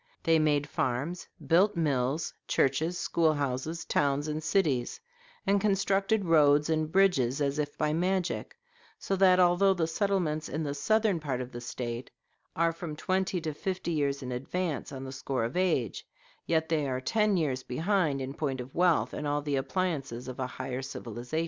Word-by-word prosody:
They 165 -1 +4
made 145 -2 +2
farms, 145 +7 -2 0.2
built 190 +5 +4
mills, 145 -1 0
churches, 160 +6 +1
school 165 -2 +2
houses, 145 +4 -2
towns, 145 +1 +1
and 155 0 -2
cities, 155 -8 0 0.5
and 200 0 +3
constructed 195 0 +1
roads 150 -2 +4
and 155 -1 0
bridges 160 -9 +3
as 140 0 0
if 145 -1 -3
by 150 0 +1
magic; 185 - -1 0.4
so 195 - -2
that 185 -1 +5
although 180 +2 +4
the 170 -3 +1
settlements 165 -3 -1
in 155 - -2
the 140 -2 -2
southern 215 +4 +2
part 140 -5 -3
of 125 0 -5
the 120 - -7
State 120 0 -5 0.5
are 165 0 +2
from 165 -2 -6
twenty 185 +3 0
to 155 -1 -3
fifty 185 +2 -3
years 140 -3 0
in 125 - -5
advance 150 +5 -3
on 135 -1 -6
the 130 - -6
score 130 -2 -2
of 115 +3 -3
age, 185 0 0 0.4
yet 160 -1 +2
are 145 -5 0
they - - -5
ten 210 -3 +2
years 135 -6 0
behind 155 +1 0
in 135 +1 -4
point 140 -3 -2
of 125 +1 -7
wealth 175 -2 +2
and 150 - -3
all 145 0 0
the 145 -1 -1
appliances 135 -4 -2
of 130 0 -7
a 130 - -1
higher 130 0 -5
civilization." 125 +2 -5
155 Hz, 175 wpm, -29 LUFS, 135-180 Hz, 0.5 s, that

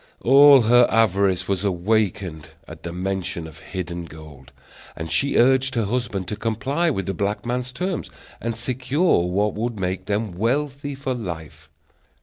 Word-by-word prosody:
All 140 +1 +8
her 120 +2 +5
avarice 100 -4 +2
was 100 -1 -1
awakened 90 -4 -1
at - - -11
the 85 - -6
mention 90 -1 -3
of 80 0 -12
hidden 85 +1 -6
gold, 75 -4 -13 0.4
and 80 0 -6
she 135 +12 +1
urged 130 +1 +3
her 115 -2 +1
husband 100 -4 -2
to 105 - -3
comply 130 +10 -1
with 95 - -2
the 95 - -2
black 100 +4 -2
man's 125 +1 -2
terms, 180 +7 -3 0.3
and 115 0 -2
secure 130 - +1
what 100 +4 0
would 115 0 -3
make 95 +1 -3
them 105 0 -1
wealthy 140 +8 -2
for 135 -1 -3
life. 80 -8 -7
105 Hz, 155 wpm, -22 LUFS, 90-125 Hz, 0.4 s, All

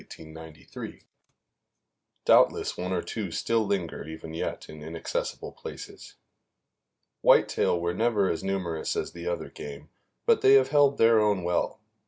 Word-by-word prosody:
Doubtless - - +4
one 90 +1 -4
or 90 -2 -1
two 105 -4 -4
still 110 +5 0
linger 90 -5 -2
even 80 0 -8
yet 80 - -4
in 75 0 -11
inaccessible 80 +2 -4
places. - - -10 1.1
Whitetail 85 - +4
were 85 +1 -1
never 110 -1 +2
as 80 - -2
numerous 90 -5 -2
as - - -2
the 85 0 -8
other 85 - -3
game, 75 0 -9 0.4
but - - +4
they 135 +1 +7
have 135 -1 +5
held 145 -1 +4
their 115 0 +5
own 105 -4 +2
well. 85 0 -1
90 Hz, 135 wpm, -27 LUFS, 80-110 Hz, 1.1 s, they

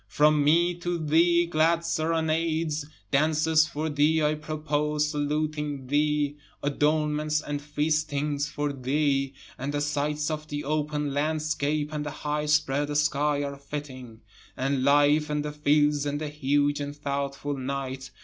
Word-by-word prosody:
From 150 +7 +3
me 170 +4 +4
to 175 0 -2
thee 170 +2 +3
glad 165 +1 +2
serenades, 160 -1 0 0.2
Dances 155 +2 +3
for 155 -1 -3
thee 155 +1 +2
I 150 0 +3
propose 150 -1 -1
saluting 150 -1 -2
thee, 145 +1 +1 0.3
adornments 150 +1 +1
and 145 -1 -4
feastings 150 -1 -1
for 145 -1 -2
thee, 135 0 0 0.2
And 135 +3 -3
the - - +1
sights 150 +1 -1
of 155 0 -4
the 145 0 -4
open 150 -1 -1
landscape 150 0 -1
and 150 -1 -2
the 150 - -4
high 150 +1 -3
spread 145 -1 +1
sky 150 -1 +1
are 140 0 -5
fitting, 130 -5 -8 0.4
And 135 0 0
life 145 +2 +4
and 150 0 -1
the 150 - -3
fields, 150 0 +2
and 145 0 -2
the 155 -1 -3
huge 145 0 +1
and 145 0 -4
thoughtful 140 0 -3
night. 130 0 -4
150 Hz, 140 wpm, -27 LUFS, 145-155 Hz, 0.4 s, me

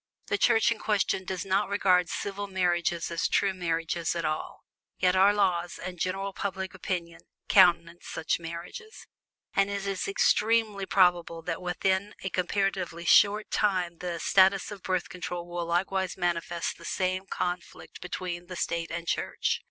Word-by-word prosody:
The 405 - +1
Church 225 +1 +4
in 230 - -2
question 200 -3 0
does 185 0 -4
not 195 +2 +1
regard 185 -3 +3
"civil 200 0 -4
marriages" 175 -3 0
as 170 - 0
true 195 -1 +2
marriages 165 -2 -1
at 170 -1 -2
all 155 0 -3 0.3
yet 180 0 +2
our 195 +2 +6
laws, 180 -4 0
and 180 -1 -7
general 195 +2 -2
public 190 -1 -4
opinion, 170 -3 -4 0.3
countenance 170 0 +4
such 160 - -1
marriages; 170 - -8 0.5
and 195 0 +2
it 200 -1 -3
is 195 -1 -2
extremely 210 0 +2
probable 175 -3 +2
that - - -3
within 190 +3 -1
a 190 - -3
comparatively 180 -2 -1
short 210 +4 +5
time 180 -5 0
the 175 -2 -4
status 190 +1 +4
of 200 -2 -8
Birth 185 -1 -1
Control 175 +1 -6
will 175 -1 -4
likewise 190 +2 0
manifest 175 -1 -2
the - - -13
same 185 +1 -1
conflict 180 -1 -5
between 175 -1 -5
State 170 -1 -2
and 170 0 -5
Church. - - -1
185 Hz, 150 wpm, -28 LUFS, 170-195 Hz, 0.5 s, our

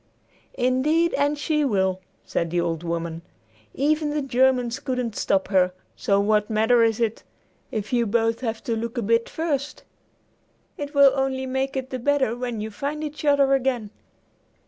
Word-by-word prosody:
"Indeed 295 +7 +2
and 290 +1 +1
she 300 +1 0
will," 190 -7 +1 0.2
said 170 - -1
the 175 +1 0
old 165 -2 -1
woman. 170 -1 -3 0.5
"Even 300 +2 +1
the 295 -1 -1
Germans 250 -2 +2
couldn't 250 -4 -3
stop 190 -1 0
her; 185 -2 +3 0.2
so 200 0 +1
what 210 +1 +2
matter 225 +2 +3
is 225 -1 +2
it, 225 -2 -1 0.5
if 215 +1 -4
you 235 -2 +2
both 225 +1 +1
have 225 -3 -3
to 230 - -1
look 230 +2 -4
a 235 - 0
bit 230 +3 +1
first? 295 -3 -3 0.9
It 290 0 -6
will 280 -1 +7
only 265 -1 -1
make 265 +1 -2
it 260 0 -4
the 255 - -3
better 265 -2 +1
when 245 -3 -4
you 220 +1 -5
find 285 +8 -4
each 300 0 -6
other 285 -2 +4
again." 250 -6 0
245 Hz, 170 wpm, -24 LUFS, 215-275 Hz, 0.9 s, will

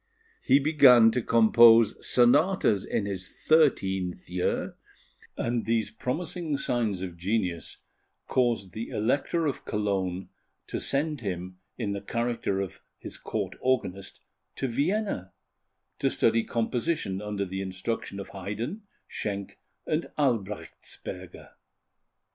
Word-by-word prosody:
He 135 - +5
began 135 -6 +6
to 125 - 0
compose 115 -1 +6
sonatas 120 - +3
in 100 - -1
his 95 -2 -4
thirteenth 95 - +1
year, 90 0 -1 0.6
and 120 -1 -1
these 115 -1 +1
promising 150 +5 -3
signs 115 -9 -1
of 90 -2 -6
genius 90 -2 -2 0.5
caused 120 -7 +1
the 110 +1 -5
Elector 140 +9 0
of 145 - -2
Cologne 95 -3 -2 0.4
to - - -4
send 145 0 0
him, 90 -2 -5 0.2
in 110 -5 -2
the 100 -1 -3
character 115 -3 -1
of 95 - -6 0.2
his - - -6
Court - - -4
Organist, 110 -7 -1 0.3
to 135 - -2
Vienna, 145 - -1 0.7
to - - +2
study 115 0 +2
composition 115 - -1
under 105 -1 -3
the 95 +1 -4
instruction 95 +2 -4
of 100 - -7
Haydn, 105 - -5 0.3
Schenk, 100 -2 -5 0.3
and 155 +2 -1
Albrechtsberger. 105 - -4
115 Hz, 115 wpm, -27 LUFS, 95-130 Hz, 0.7 s, began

